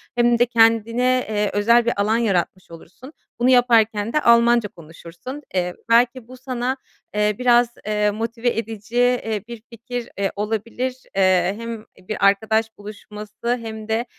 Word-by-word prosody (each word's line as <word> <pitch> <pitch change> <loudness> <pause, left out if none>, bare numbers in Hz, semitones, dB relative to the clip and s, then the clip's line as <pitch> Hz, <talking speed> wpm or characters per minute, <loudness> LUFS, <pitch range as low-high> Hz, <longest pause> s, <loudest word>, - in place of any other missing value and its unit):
hem 240 -1 +3
de 240 - +5
kendine, 230 +2 +2
eee, 210 -1 0
özel 235 +3 +3
bir 235 -4 0
alan 215 +2 +1
yaratmış 185 -5 -1
olursun. 190 - -13 0.3
Bunu 245 +2 +3
yaparken 230 -3 +3
de 305 - +2
Almanca 235 -2 +4
konuşursun. 170 - -11
Eee, 180 -1 0 0.2
belki 240 +1 +2
bu 255 +1 -12
sana, 255 0 -3 0.4
eee, 210 0 +1
biraz, 245 -1 +4 0.2
eee, 210 0 +1
motive 230 +3 -2
edici, 225 0 -6
eee, 245 -4 +1
bir 235 -2 -9
fikir, 240 +1 -7
eee, 195 -1 -1
olabilir. 225 +5 -3 0.2
Eee, 185 -1 +3
hem 230 -1 -7 0.2
bir 215 -2 -1
arkadaş 220 +3 +1
buluşması 210 +3 -6
hem 220 -1 -7
de, 225 +2 -1
225 Hz, 150 wpm, -21 LUFS, 210-240 Hz, 0.4 s, de